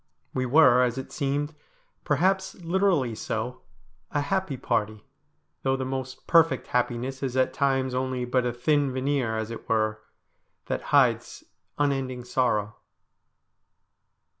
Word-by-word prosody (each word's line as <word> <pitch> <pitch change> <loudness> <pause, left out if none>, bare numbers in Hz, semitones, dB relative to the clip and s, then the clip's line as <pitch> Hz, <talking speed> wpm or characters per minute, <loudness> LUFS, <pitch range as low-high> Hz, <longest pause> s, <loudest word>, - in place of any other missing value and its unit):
We 130 0 -1
were, 125 -2 +6
as 125 0 +1
it 130 - -6
seemed, 145 +1 -1 0.5
perhaps 190 +6 +1
literally 175 - +1
so, 110 +3 -4 0.5
a 145 - 0
happy 175 -1 -1
party, 110 -4 -2 0.6
though 135 0 +1
the 130 -1 -3
most 130 0 -5
perfect 165 -6 +4
happiness 125 +2 -1
is 130 -2 -2
at 130 0 +2
times 135 -1 +1
only 130 -1 -1
but 125 +1 +1
a 125 - 0
thin 140 +3 +1
veneer, 130 -3 0
as 110 +1 -3
it 115 - -9
were, 110 -1 +1 0.6
that - - -2
hides - - +2 0.3
unending 135 -3 -1
sorrow. 110 -4 0
130 Hz, 130 wpm, -26 LUFS, 120-145 Hz, 0.6 s, were